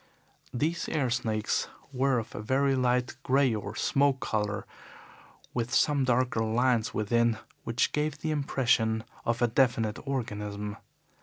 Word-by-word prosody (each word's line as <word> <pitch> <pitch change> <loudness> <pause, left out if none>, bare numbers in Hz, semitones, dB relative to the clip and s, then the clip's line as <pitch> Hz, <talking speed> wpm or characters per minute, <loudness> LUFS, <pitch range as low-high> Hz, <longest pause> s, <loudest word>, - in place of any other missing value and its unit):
These 160 +7 -1
air 140 -6 0
snakes 110 -3 0 0.3
were 130 0 +2
of 115 -1 -4
a - - -5
very 135 +5 +2
light 125 -1 +1
grey 135 -2 +3
or 105 0 -4
smoke 140 +1 +2
colour, 105 -3 -2 0.9
with 120 -1 -2
some 140 0 +3
darker 125 -2 +2
lines 115 +1 +2
within, 115 +1 +1 0.3
which 115 +3 +1
gave 150 -1 -1
the 155 +1 -2
impression 120 -6 +1 0.2
of 115 +1 +1
a - - +5
definite 115 -3 +1
organism. 105 -5 -3
120 Hz, 135 wpm, -29 LUFS, 110-135 Hz, 0.9 s, a